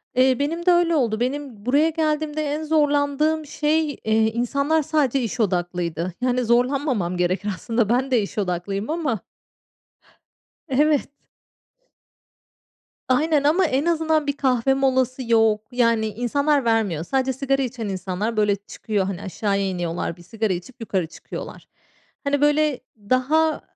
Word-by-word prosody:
eee, 255 Hz, +1 st, +4 dB
benim 330 Hz, +4 st, -2 dB
de 360 Hz, -, +6 dB
öyle 345 Hz, -1 st, +3 dB
oldu. 230 Hz, -7 st, +1 dB
Benim 255 Hz, -4 st, -3 dB
buraya 285 Hz, +6 st, +3 dB
geldiğimde 310 Hz, -1 st, -1 dB
en 300 Hz, +1 st, -2 dB
zorlandığım 300 Hz, 0 st, +1 dB
şey, 305 Hz, +2 st, 0 dB
eee, 220 Hz, 0 st, +2 dB
insanlar 280 Hz, +7 st, +1 dB
sadece 275 Hz, -3 st, +1 dB
iş 240 Hz, +2 st, -4 dB
odaklıydı. 175 Hz, -3 st, -1 dB
Yani, 250 Hz, 0 st, +1 dB
zorlanmamam 245 Hz, -, +1 dB
gerekir 185 Hz, +4 st, 0 dB
aslında, 225 Hz, +2 st, -1 dB
ben 255 Hz, +3 st, +1 dB
de 245 Hz, -3 st, +4 dB
iş 200 Hz, -, -6 dB
odaklıyım 195 Hz, +2 st, -2 dB
ama 305 Hz, -9 st, -1 dB, 1.5 s
Evet. 295 Hz, +2 st, +2 dB, 2.0 s
Aynen 295 Hz, +3 st, +2 dB
ama 335 Hz, +6 st, +4 dB
en 275 Hz, 0 st, 0 dB
azından 320 Hz, -2 st, +1 dB
bir 285 Hz, 0 st, -1 dB
kahve 260 Hz, -1 st, +2 dB
molası 260 Hz, -1 st, +1 dB
yok. 220 Hz, -1 st, +3 dB
Yani, 230 Hz, -3 st, +2 dB
insanlar 275 Hz, +6 st, 0 dB
vermiyor. 215 Hz, -9 st, +1 dB
Sadece 265 Hz, +4 st, 0 dB
sigara 275 Hz, +1 st, 0 dB
içen 240 Hz, -4 st, -4 dB
insanlar, 190 Hz, +4 st, -3 dB
böyle, 210 Hz, -1 st, +2 dB
çıkıyor, 205 Hz, 0 st, -3 dB
hani, 190 Hz, -2 st, -4 dB
aşağıya 200 Hz, +1 st, -1 dB
iniyorlar. 175 Hz, -2 st, -3 dB
Bir 175 Hz, -, -15 dB
sigara 220 Hz, +3 st, -2 dB
içip 180 Hz, +8 st, -6 dB
yukarı 190 Hz, -6 st, -1 dB
çıkıyorlar. 160 Hz, -, -9 dB, 0.6 s
Hani, 280 Hz, 0 st, +1 dB
böyle, 295 Hz, -1 st, +2 dB, 0.2 s
daha 255 Hz, +9 st, +1 dB
255 Hz, 135 wpm, -22 LUFS, 210-290 Hz, 2.0 s, de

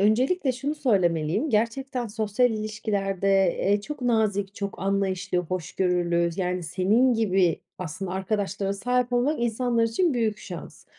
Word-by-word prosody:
öncelikle 255 Hz, -, +2 dB
şunu 275 Hz, +4 st, -3 dB
söylemeliyim. 185 Hz, -, +1 dB
Gerçekten 240 Hz, +3 st, 0 dB
sosyal 220 Hz, +3 st, +1 dB
ilişkilerde, 210 Hz, -3 st, -2 dB, 0.3 s
eee, 200 Hz, +1 st, +2 dB
çok 290 Hz, +6 st, -7 dB
nazik, 210 Hz, -4 st, +1 dB
çok 200 Hz, -1 st, -5 dB
anlayışlı, 195 Hz, -1 st, 0 dB
hoşgörülü 175 Hz, 0 st, 0 dB
yani 180 Hz, -1 st, -1 dB
senin 195 Hz, +9 st, +2 dB
gibi 190 Hz, -6 st, +2 dB, 0.2 s
aslında 185 Hz, +2 st, -5 dB
arkadaşlara 195 Hz, 0 st, -1 dB
sahip 245 Hz, +4 st, 0 dB
olmak 245 Hz, +3 st, +1 dB
insanlar 235 Hz, 0 st, +1 dB
için 270 Hz, +8 st, +1 dB
büyük 220 Hz, -3 st, 0 dB
şans 175 Hz, -4 st, -9 dB
205 Hz, 125 wpm, -25 LUFS, 185-240 Hz, 0.3 s, öncelikle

